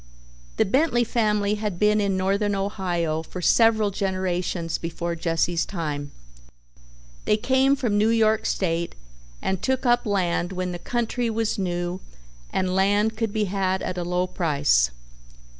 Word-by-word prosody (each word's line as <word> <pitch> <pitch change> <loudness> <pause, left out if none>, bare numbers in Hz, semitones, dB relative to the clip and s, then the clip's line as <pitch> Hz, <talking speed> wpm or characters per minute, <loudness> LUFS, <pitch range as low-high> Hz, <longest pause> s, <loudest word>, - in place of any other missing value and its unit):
The - - +3
Bentley 260 +2 +2
family 210 -3 +1
had 210 -5 -2
been 210 +2 +3
in 195 -2 0
Northern 200 +2 +1
Ohio 175 -5 -1
for 165 +3 -8
several 220 +3 +4
generations 185 -3 -2
before 170 +1 -3
Jesse's 165 +1 0
time. 150 -6 -4 1.2
They 210 - +3
came 265 +4 +3
from 225 -7 0
New 215 +2 +3
York 220 -1 +2
State 170 -2 -1 0.5
and 190 -2 -1
took 260 0 0
up 240 -1 +3
land 180 -2 0
when 185 0 -2
the 175 - -5
country 240 +3 -1
was 225 -1 -1
new 175 -1 -2 0.5
and 185 -1 0
land 205 +3 +2
could 225 -1 -2
be 215 0 0
had 190 -1 -1
at 185 - -3
a - - -2
low 180 +1 0
price. 145 - +2
195 Hz, 145 wpm, -24 LUFS, 175-215 Hz, 1.2 s, several